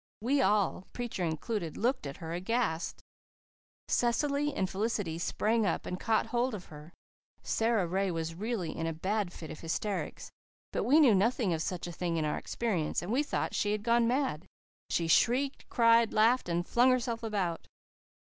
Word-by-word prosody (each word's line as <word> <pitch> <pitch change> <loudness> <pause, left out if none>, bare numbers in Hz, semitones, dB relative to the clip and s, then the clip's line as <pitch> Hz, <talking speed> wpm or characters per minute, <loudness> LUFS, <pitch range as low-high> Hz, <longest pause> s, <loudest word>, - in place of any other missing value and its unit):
We 270 +5 +2
all, 205 -4 +1
preacher 240 -6 -3
included, 165 +2 -3
looked 245 - 0
at 140 - -7
her 165 -1 -6
aghast. 185 -2 -1 0.8
Cecily 280 +5 +1
and 190 - -1
Felicity 195 -4 -2
sprang 220 +6 +1
up 205 - -1
and 180 - -4
caught 225 -2 +1
hold 245 0 0
of 185 - -8
her. 150 +2 -11 0.5
Sara 225 -4 +1
Ray 190 +3 0
was 165 -1 -3
really 205 -1 -3
in 165 - -2
a 165 - -1
bad 190 +3 -1
fit 160 -3 -9
of - - -8
hysterics, 195 +5 -3 0.4
but - - -1
we 290 +5 +5
knew 270 -8 +6
nothing 205 -1 +2
of 160 - -2
such 180 0 -3
a 175 - -5
thing 170 0 -2
in 155 - 0
our 150 - -1
experience, 190 -12 -2
and 185 - -4
we 260 +5 +3
thought 295 - -2
she 205 0 +1
had 210 -1 -3
gone 235 0 +3
mad. 250 - -1 0.4
She 170 - 0
shrieked, 260 - +2
cried, 230 -1 +4
laughed, 225 -1 +3
and 175 +1 -1
flung 245 +2 +4
herself 245 -2 0
about. 200 -7 -2
210 Hz, 180 wpm, -31 LUFS, 170-235 Hz, 0.8 s, knew